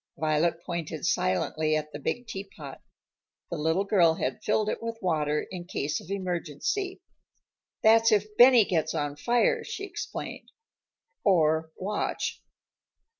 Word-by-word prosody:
Violet 160 Hz, +2 st, +1 dB
pointed 165 Hz, -3 st, -4 dB
silently 155 Hz, +12 st, +1 dB
at 150 Hz, 0 st, -3 dB
the 145 Hz, -, -5 dB
big 245 Hz, -, -3 dB
teapot. 195 Hz, -, -8 dB, 0.7 s
The -, -, -2 dB
little 160 Hz, +5 st, +1 dB
girl 175 Hz, -5 st, +4 dB
had 130 Hz, -4 st, -3 dB
filled 210 Hz, 0 st, +1 dB
it -, -, -2 dB
with 230 Hz, 0 st, -4 dB
water 150 Hz, -5 st, 0 dB
in 180 Hz, -2 st, -6 dB
case 150 Hz, -4 st, -2 dB
of -, -, -14 dB
emergency. 195 Hz, -, -3 dB, 0.8 s
"That's 225 Hz, +1 st, +6 dB
if 210 Hz, 0 st, +1 dB
Benny 245 Hz, -2 st, +8 dB
gets 160 Hz, -4 st, 0 dB
on 145 Hz, -1 st, -2 dB
fire," 245 Hz, -, +2 dB
she 395 Hz, -, -6 dB
explained 400 Hz, -, -6 dB, 0.7 s
"or 160 Hz, -4 st, +3 dB
Watch." 205 Hz, +3 st, -2 dB
175 Hz, 130 wpm, -27 LUFS, 155-215 Hz, 0.8 s, Benny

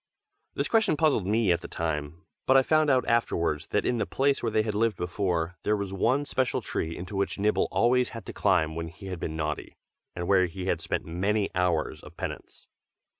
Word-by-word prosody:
This -, -, 0 dB
question 220 Hz, -9 st, +2 dB
puzzled 145 Hz, -, +2 dB
me 110 Hz, -2 st, +2 dB
at 85 Hz, 0 st, +1 dB
the -, -, -7 dB
time, 80 Hz, -1 st, -3 dB, 0.2 s
but 130 Hz, -, +6 dB
I 135 Hz, -, +5 dB
found 155 Hz, +1 st, +3 dB
out 130 Hz, -2 st, +3 dB
afterwards 85 Hz, -10 st, +1 dB
that -, -, 0 dB
in 120 Hz, -, +1 dB
the 105 Hz, -, -1 dB
place 140 Hz, +1 st, +1 dB
where 115 Hz, -, -1 dB
they 110 Hz, 0 st, +2 dB
had 110 Hz, -1 st, -2 dB
lived 110 Hz, +1 st, +1 dB
before, 90 Hz, -1 st, -1 dB
there 105 Hz, 0 st, +1 dB
was 100 Hz, -1 st, -4 dB
one 125 Hz, +9 st, +1 dB
special 130 Hz, -3 st, 0 dB
tree 80 Hz, +1 st, -3 dB
into 90 Hz, +3 st, -7 dB
which 100 Hz, 0 st, -1 dB
Nibble 105 Hz, +2 st, +2 dB
always 125 Hz, +2 st, +2 dB
had 115 Hz, -, -9 dB
to -, -, -7 dB
climb 80 Hz, 0 st, +2 dB
when 85 Hz, 0 st, -3 dB
he 85 Hz, +5 st, -12 dB
had 90 Hz, -2 st, -5 dB
been 80 Hz, -, -4 dB
naughty, 75 Hz, -1 st, -4 dB, 0.4 s
and 85 Hz, 0 st, -4 dB
where 95 Hz, -2 st, +4 dB
he 90 Hz, +2 st, -6 dB
had -, -, 0 dB
spent -, -, -2 dB
many 100 Hz, +5 st, 0 dB
hours 90 Hz, -4 st, 0 dB
of -, -, -14 dB
penance. -, -, -7 dB
100 Hz, 215 wpm, -27 LUFS, 85-115 Hz, 0.4 s, but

